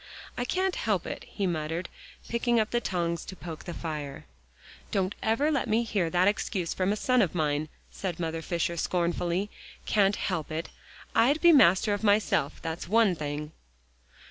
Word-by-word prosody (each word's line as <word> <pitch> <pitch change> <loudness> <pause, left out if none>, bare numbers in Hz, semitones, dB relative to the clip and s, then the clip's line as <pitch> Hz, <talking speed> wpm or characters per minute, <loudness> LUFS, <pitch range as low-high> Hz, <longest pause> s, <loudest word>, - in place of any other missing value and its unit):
"I 245 - -2
can't 370 +6 0
help 205 -6 0
it," - - -6
he 200 - -3
muttered, 165 0 -2 0.4
picking 235 0 +1
up 215 - 0
the 240 - +1
tongs 170 -4 -1
to 190 - -8
poke 165 -4 -8
the 175 - -5
fire. 150 -4 -5 0.6
"Don't 190 0 0
ever 255 +8 +2
let 280 - 0
me 225 +2 +3
hear 200 -7 0
that 180 +2 +3
excuse 190 -4 0
from 185 +1 0
a - - +1
son 250 +3 +2
of 180 -4 0
mine," 150 -1 0 0.2
said 180 -4 -4
Mother 165 -1 -2
Fisher 170 0 -1
scornfully. 175 +3 0 0.3
"Can't 205 -1 +3
help 175 -6 -2
it. 160 +2 -3 0.4
I'd 280 +7 +4
be 345 +1 +7
master 205 - +5
of 205 +1 -3
myself, 205 -8 +2
that's 165 +1 -4
one 220 0 +4
thing." 150 0 -4
185 Hz, 170 wpm, -28 LUFS, 165-220 Hz, 0.6 s, be